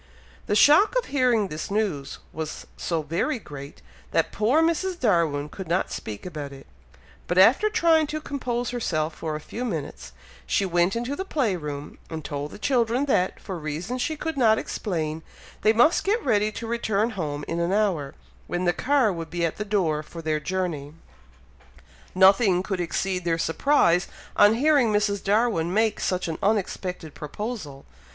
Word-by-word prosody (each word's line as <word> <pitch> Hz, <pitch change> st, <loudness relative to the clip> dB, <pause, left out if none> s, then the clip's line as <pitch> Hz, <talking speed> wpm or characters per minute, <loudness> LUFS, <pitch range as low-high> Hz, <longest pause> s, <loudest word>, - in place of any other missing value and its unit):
The 205 Hz, -, +1 dB
shock 340 Hz, -, +6 dB
of -, -, +1 dB
hearing 245 Hz, -7 st, +2 dB
this 155 Hz, -1 st, -5 dB
news 195 Hz, -10 st, -2 dB, 0.2 s
was 155 Hz, -1 st, -5 dB
so 165 Hz, -3 st, -2 dB
very 170 Hz, -, -1 dB
great, 145 Hz, -, -10 dB, 0.3 s
that -, -, +1 dB
poor 245 Hz, +10 st, +2 dB
Mrs. 345 Hz, +2 st, 0 dB
Darwin 165 Hz, -, +1 dB
could 185 Hz, +4 st, -8 dB
not 175 Hz, +3 st, 0 dB
speak 105 Hz, -2 st, -6 dB
about 150 Hz, -5 st, -6 dB
it, 135 Hz, 0 st, -12 dB, 0.6 s
but 175 Hz, -, -1 dB
after 245 Hz, -, +6 dB
trying 335 Hz, -8 st, +3 dB
to 310 Hz, +1 st, -3 dB
compose 245 Hz, -5 st, -3 dB
herself 165 Hz, -10 st, -1 dB
for 155 Hz, 0 st, -4 dB
a -, -, -4 dB
few 230 Hz, +10 st, -6 dB
minutes, 155 Hz, -, -5 dB, 0.4 s
she 195 Hz, -, +1 dB
went 175 Hz, +2 st, +2 dB
into 240 Hz, +4 st, -2 dB
the 380 Hz, -, -3 dB
play 265 Hz, -, 0 dB
room, 150 Hz, -3 st, -6 dB
and 160 Hz, -3 st, -6 dB
told 145 Hz, 0 st, -4 dB
the -, -, -10 dB
children 245 Hz, +2 st, +1 dB
that, 185 Hz, -9 st, +1 dB
for 185 Hz, -3 st, -6 dB
reasons 165 Hz, +11 st, -4 dB
she 315 Hz, -, -1 dB
could 320 Hz, 0 st, -4 dB
not 220 Hz, -4 st, +5 dB
explain, 160 Hz, -6 st, -3 dB, 0.4 s
they 215 Hz, -, +5 dB
must 240 Hz, +9 st, +4 dB
get 430 Hz, +4 st, 0 dB
ready 215 Hz, -4 st, +2 dB
to 230 Hz, -, -6 dB
return 225 Hz, -1 st, 0 dB
home 150 Hz, -7 st, -4 dB
in 165 Hz, -, -2 dB
an 170 Hz, +1 st, 0 dB
hour, 190 Hz, -9 st, 0 dB, 0.3 s
when 175 Hz, +1 st, -2 dB
the 175 Hz, -, +3 dB
car 255 Hz, -4 st, +2 dB
would 165 Hz, -2 st, -6 dB
be 170 Hz, +1 st, -1 dB
at 165 Hz, -, -3 dB
the 210 Hz, -, -2 dB
door 185 Hz, -8 st, 0 dB
for 165 Hz, +2 st, -10 dB
their 155 Hz, -1 st, 0 dB
journey. 155 Hz, -3 st, -3 dB, 1.2 s
Nothing 190 Hz, 0 st, +5 dB
could 190 Hz, -2 st, -2 dB
exceed 180 Hz, +2 st, -2 dB
their 165 Hz, -1 st, +1 dB
surprise 175 Hz, -, +2 dB, 0.3 s
on 205 Hz, +2 st, +6 dB
hearing 275 Hz, -3 st, +3 dB
Mrs. 205 Hz, -1 st, +1 dB
Darwin 205 Hz, -5 st, +1 dB
make 220 Hz, +2 st, +1 dB
such 185 Hz, -1 st, -1 dB
an 160 Hz, -, -4 dB
unexpected 185 Hz, -5 st, -1 dB
proposal. 150 Hz, -, -6 dB
195 Hz, 175 wpm, -25 LUFS, 160-235 Hz, 1.2 s, shock